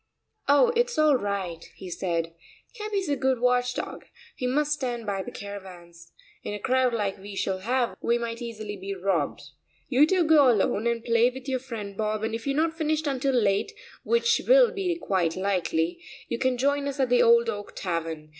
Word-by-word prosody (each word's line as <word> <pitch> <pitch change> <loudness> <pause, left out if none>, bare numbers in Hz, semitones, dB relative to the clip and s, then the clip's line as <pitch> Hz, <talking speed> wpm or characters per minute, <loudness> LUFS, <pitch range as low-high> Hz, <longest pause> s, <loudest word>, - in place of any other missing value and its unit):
"Oh, 470 +13 +5
it's 480 0 +1
all 305 -2 +5
right," 195 -7 -3
he 185 -2 -9
said; 165 -2 -2 0.4
"Capi's 420 -4 -3
a 290 - +1
good 260 -2 0
watch 250 0 +2
dog; - - -5 0.3
he 250 - -2
must 295 +3 +1
stand 245 -5 -3
by 200 -2 -2
the 220 - -7
caravans. 180 -6 -10 0.3
In 205 - -5
a - - -6
crowd 255 +2 +2
like 205 -4 -2
we 200 +1 -9
shall 190 -1 -1
have 240 +4 0
we 235 - +2
might 235 0 -5
easily 215 -3 -6
be 195 0 -6
robbed. 180 -6 -1 0.5
You 280 +3 +5
two 370 0 +3
go 305 -4 +6
alone 215 0 +1
and 235 -1 -1
play 230 +1 +4
with 260 +1 -10
your 260 -1 0
friend 225 -6 -7
Bob, 215 +1 -2
and 225 0 -2
if 225 +3 -5
you 275 - 0
are 305 - +3
not 320 - -8
finished 315 -1 -1
until 270 -1 0
late, 210 - +1 0.3
which 465 0 +2
will - - +6
be 370 -3 -1
quite 185 - 0
likely, 175 -3 -1 0.3
you 235 - -3
can 260 -1 +1
join 280 +2 +1
us 280 0 -4
at 260 -2 +2
the 245 0 +4
Old 235 0 +5
Oak 205 -2 -5
Tavern. 165 -4 -4
235 Hz, 200 wpm, -26 LUFS, 195-275 Hz, 0.5 s, go